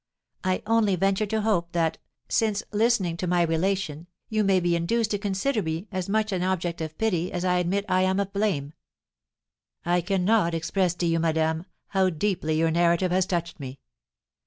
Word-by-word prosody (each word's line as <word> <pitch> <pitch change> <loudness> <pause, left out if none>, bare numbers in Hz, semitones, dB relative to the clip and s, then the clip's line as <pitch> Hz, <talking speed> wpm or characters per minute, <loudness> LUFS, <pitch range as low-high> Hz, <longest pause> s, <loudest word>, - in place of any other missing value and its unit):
I 185 -1 0
only 220 -3 +3
venture 195 +3 +1
to 220 +1 -1
hope 175 -6 0
that, 165 -2 0 0.3
since 215 -2 +1
listening 210 -6 +1
to 180 - -3
my 175 0 +3
relation, 170 -1 -1 0.2
you 215 -1 +1
may 195 -2 +3
be 175 -1 +1
induced 215 +6 0
to 205 - 0
consider 205 +5 0
me 160 +3 -4
as 185 -1 -3
much 215 +1 +1
an 185 -2 -1
object 180 -2 -1
of 155 -1 -5
pity 180 -6 0
as 175 +1 -3
I 180 0 +2
admit 190 +3 0
I 185 -2 +2
am 190 +1 +2
of 200 -1 -2
blame." 185 -9 -1 1.1
"I 175 +1 +2
cannot 185 0 +2
express 180 +2 0
to 175 - -2
you, 165 0 +2
madame, 160 +1 0 0.2
how 190 -2 +2
deeply 160 -2 -1
your 165 0 +2
narrative 170 +2 +2
has 185 0 +2
touched 170 -2 -3
me. 135 -1 -7
180 Hz, 180 wpm, -26 LUFS, 170-200 Hz, 1.1 s, only